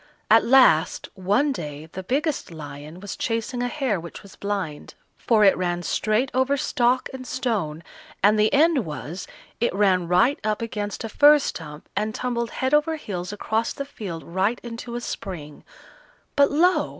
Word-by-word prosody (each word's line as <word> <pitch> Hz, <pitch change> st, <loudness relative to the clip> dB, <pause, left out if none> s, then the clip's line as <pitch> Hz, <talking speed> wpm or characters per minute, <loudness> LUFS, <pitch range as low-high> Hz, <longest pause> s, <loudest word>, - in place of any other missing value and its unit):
At -, -, +7 dB
last, 240 Hz, -12 st, +4 dB
one 205 Hz, +10 st, +1 dB
day 150 Hz, -, -6 dB
the 190 Hz, -, -6 dB
biggest 285 Hz, -, -1 dB
lion 155 Hz, 0 st, -9 dB
was 205 Hz, -2 st, -6 dB
chasing 230 Hz, +2 st, -2 dB
a 245 Hz, -, 0 dB
hare 250 Hz, -, -1 dB
which 170 Hz, +4 st, -10 dB
was 200 Hz, -, -14 dB
blind, 195 Hz, -7 st, -4 dB, 0.2 s
for 220 Hz, -3 st, +2 dB
it 195 Hz, -, +6 dB
ran 175 Hz, -1 st, -2 dB
straight 215 Hz, +9 st, 0 dB
over 260 Hz, +2 st, +2 dB
stock 250 Hz, -1 st, +1 dB
and 255 Hz, -1 st, -7 dB
stone, 200 Hz, -, -2 dB, 0.4 s
and 210 Hz, +2 st, +5 dB
the 215 Hz, +1 st, +4 dB
end 300 Hz, -2 st, +4 dB
was, 155 Hz, +3 st, -6 dB, 0.3 s
it 235 Hz, -, +1 dB
ran 190 Hz, -4 st, +3 dB
right 185 Hz, +11 st, +3 dB
up 215 Hz, -1 st, 0 dB
against 210 Hz, -3 st, -4 dB
a 225 Hz, -, -4 dB
fir 295 Hz, +6 st, +7 dB
stump 155 Hz, -, -6 dB
and 215 Hz, +1 st, -1 dB
tumbled 235 Hz, -2 st, -2 dB
head 260 Hz, +2 st, -2 dB
over 300 Hz, +2 st, +3 dB
heels 185 Hz, -, -5 dB
across 220 Hz, +2 st, -1 dB
the 280 Hz, -, -5 dB
field 190 Hz, -, -7 dB
right 195 Hz, +7 st, 0 dB
into 235 Hz, 0 st, -7 dB
a 240 Hz, -, -3 dB
spring; 155 Hz, -10 st, -7 dB, 0.7 s
but 280 Hz, 0 st, +5 dB
lo! 350 Hz, +5 st, +3 dB
215 Hz, 170 wpm, -24 LUFS, 180-255 Hz, 0.7 s, At